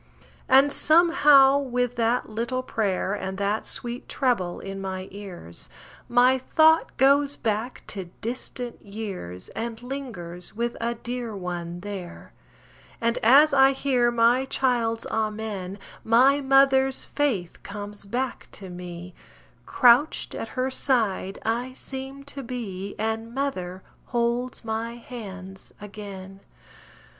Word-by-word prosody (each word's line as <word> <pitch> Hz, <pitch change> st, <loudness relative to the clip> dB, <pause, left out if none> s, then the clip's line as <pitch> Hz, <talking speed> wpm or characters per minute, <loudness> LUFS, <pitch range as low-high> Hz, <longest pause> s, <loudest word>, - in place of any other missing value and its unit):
And, 270 Hz, +2 st, +6 dB
somehow 295 Hz, -5 st, +6 dB
with 245 Hz, -3 st, -1 dB
that 235 Hz, +1 st, +1 dB
little 235 Hz, +4 st, -2 dB
pray'r 200 Hz, -5 st, -1 dB
And 190 Hz, -2 st, -4 dB
that 200 Hz, +2 st, -1 dB
sweet 240 Hz, +1 st, -4 dB
trebble 215 Hz, -10 st, 0 dB
in 195 Hz, 0 st, -6 dB
my 190 Hz, -1 st, -4 dB
ears, 175 Hz, -, -9 dB, 0.4 s
My 250 Hz, +2 st, +5 dB
thought 315 Hz, +4 st, +3 dB
goes 280 Hz, +1 st, +4 dB
back 220 Hz, +3 st, -2 dB
to 195 Hz, -3 st, -5 dB
distant 245 Hz, +1 st, -5 dB
years, 200 Hz, -, -7 dB
And 230 Hz, +1 st, -5 dB
lingers 215 Hz, -11 st, -6 dB
with 235 Hz, +1 st, -2 dB
a 235 Hz, +1 st, -1 dB
dear 240 Hz, -1 st, -5 dB
one 175 Hz, -2 st, -5 dB
there; 195 Hz, -3 st, -8 dB, 0.7 s
And 230 Hz, +1 st, 0 dB
as 280 Hz, +6 st, +6 dB
I 270 Hz, 0 st, +6 dB
hear 255 Hz, -3 st, +2 dB
my 240 Hz, +2 st, +3 dB
child's 240 Hz, -4 st, 0 dB
amen, 215 Hz, -3 st, -3 dB, 0.3 s
My 260 Hz, +5 st, +5 dB
mother's 270 Hz, -1 st, +4 dB
faith 235 Hz, -13 st, -1 dB
comes 205 Hz, 0 st, -5 dB
back 250 Hz, +4 st, -3 dB
to 190 Hz, -2 st, -6 dB
me 175 Hz, 0 st, -8 dB, 0.5 s
Crouched 250 Hz, +5 st, +4 dB
at -, -, -4 dB
her 255 Hz, +1 st, 0 dB
side 220 Hz, -8 st, 0 dB
I 240 Hz, +3 st, -1 dB
seem 270 Hz, +1 st, -7 dB
to 280 Hz, 0 st, -7 dB
be, 205 Hz, -6 st, -5 dB
And 225 Hz, +2 st, -3 dB
mother 190 Hz, -10 st, -3 dB, 0.2 s
holds 240 Hz, 0 st, -1 dB
my 225 Hz, +1 st, -3 dB
hands 195 Hz, -6 st, -9 dB
again. 200 Hz, -2 st, -9 dB
230 Hz, 120 wpm, -25 LUFS, 195-260 Hz, 0.7 s, And